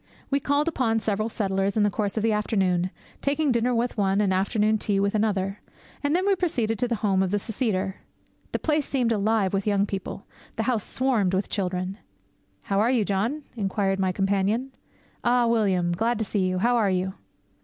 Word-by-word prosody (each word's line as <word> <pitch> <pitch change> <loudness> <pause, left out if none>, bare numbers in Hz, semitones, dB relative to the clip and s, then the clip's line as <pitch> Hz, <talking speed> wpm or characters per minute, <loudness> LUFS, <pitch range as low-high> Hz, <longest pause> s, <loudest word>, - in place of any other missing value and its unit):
We 280 - +3
called 285 +3 +1
upon 235 -8 +1
several 215 0 -1
settlers 195 -1 -1
in 210 - +4
the 205 - +2
course 205 +2 -2
of 215 - 0
the 225 - +3
afternoon, 190 -4 +1 0.3
taking 285 0 +1
dinner 240 +1 +1
with 235 -1 -1
one, 195 0 +2
and 200 -2 +2
afternoon 210 +3 +1
tea 200 -1 0
with 200 0 +1
another. 200 -2 0 0.4
And 285 +3 +2
then 370 +2 +1
we 400 -1 +4
proceeded 235 - -1
to 245 - +1
the 235 - 0
home 190 -2 +3
of 190 - +1
the 205 - +1
seceder. 200 -3 -2 0.5
The - - 0
place 300 -2 0
seemed 250 -4 +1
alive 210 -2 +1
with 195 +1 -1
young 200 -1 +3
people. 195 -1 -5 0.3
The 225 - -1
house 230 -3 0
swarmed 230 -8 +1
with 190 - -1
children. 185 0 -2 0.6
'How 195 - 0
are 220 +3 +3
you, 240 -5 +2
John?' 225 +11 -1
inquired 195 -2 0
my 190 -1 +2
companion. 200 +7 0 0.5
'Ah, 240 0 +3
William, 195 -7 +2
glad 225 +7 0
to 220 - -1
see 195 -2 0
you; 185 - -1
how 240 +6 +2
are 215 -4 +3
you?' 185 0 -1
210 Hz, 195 wpm, -25 LUFS, 195-235 Hz, 0.6 s, in